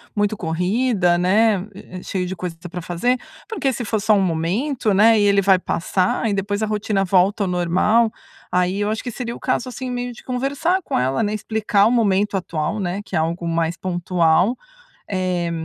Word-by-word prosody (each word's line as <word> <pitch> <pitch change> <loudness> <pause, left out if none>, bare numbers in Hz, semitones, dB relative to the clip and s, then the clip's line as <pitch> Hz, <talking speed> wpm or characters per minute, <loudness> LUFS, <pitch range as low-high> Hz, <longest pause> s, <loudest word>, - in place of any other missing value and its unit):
muito 205 0 0
corrida, 180 +2 +1
né, 200 +2 +2
e 185 -1 -12
e - - -13
cheio 185 -2 -2
de 190 - -4
coisa 180 -2 -5
que 180 +2 -10
pra 180 +1 -6
fazer. 180 +10 0 0.3
Porque 280 -12 0
se 240 - -4
for 220 0 -1
só 215 +1 +3
um 200 - +3
momento, 195 - 0
né, 220 +3 +5
e - - +3
ele 200 -1 +4
vai 190 -1 +5
passar 185 +4 0
e 205 - 0
depois 200 +2 -2
a - - +2
rotina 210 -2 0
volta 195 +3 +2
ao - - -1
normal. 185 +6 +2 0.4
Aí, 180 +2 +1
eu 205 - 0
acho 220 +3 -2
que 245 - -4
seria 235 0 -5
o - - -11
caso 255 - -1
assim 255 0 -5
meio 245 0 -3
de 235 - -14
conversar 280 +9 0
com - - -2
ela, 130 - 0
né, 210 0 -1
explicar 215 -1 +1
o - - +2
momento 205 -4 +2
atual, 170 +2 -3
né, 190 +1 -2
que - - -7
é - - +3
algo 170 +2 -2
mais 165 0 0
pontual, 175 +3 +1 0.5
eh, 185 -3 -1
200 Hz, 205 wpm, -21 LUFS, 180-220 Hz, 0.5 s, né